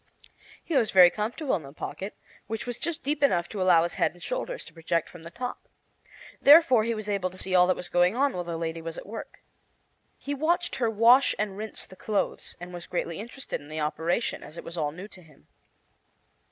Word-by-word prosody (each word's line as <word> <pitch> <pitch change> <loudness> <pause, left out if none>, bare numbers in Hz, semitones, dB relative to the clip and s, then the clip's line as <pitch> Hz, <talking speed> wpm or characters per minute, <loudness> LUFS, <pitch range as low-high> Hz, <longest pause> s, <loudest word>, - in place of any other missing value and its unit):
He 330 - -3
was 235 -5 +3
very 180 -3 +8
comfortable 230 - -1
in - - -9
the 135 -2 -11
pocket, 195 +5 -6 0.3
which 225 +1 -4
was 245 -1 -4
just 340 -1 -2
deep 290 +2 -1
enough 175 - +3
to 205 - -4
allow 175 -3 +5
his 170 - -2
head - - +3
and 175 - -15
shoulders - - -4
to - - -14
project 165 0 -1
from 175 - -13
the 165 - -9
top. 250 +8 -6 0.7
Therefore 280 -6 +7
he 230 +1 -1
was 215 -1 -6
able 200 -3 0
to 185 - -14
see 190 0 -3
all 180 -1 +6
that 185 - +2
was 180 - -5
going 180 +3 +3
on 275 +2 +2
while 180 - -3
the 170 -1 -4
lady 165 0 -3
was 165 0 -6
at - - -8
work. 220 +3 -9 0.7
He 285 - -4
watched 340 +5 0
her 240 -4 +1
wash 230 +5 +5
and 205 -2 -2
rinse 215 +2 -6
the 185 - -14
clothes, 205 +2 -2
and 175 +1 -9
was 175 -1 -8
greatly 170 -1 -3
interested 240 - -5
in 145 - -14
the 155 0 -4
operation, 160 +8 -1
as 155 - -11
it - - -7
was 170 - -7
all 150 -3 -1
new 180 +6 -9
to 190 - -16
him. 155 -4 -21
190 Hz, 225 wpm, -27 LUFS, 170-245 Hz, 0.7 s, very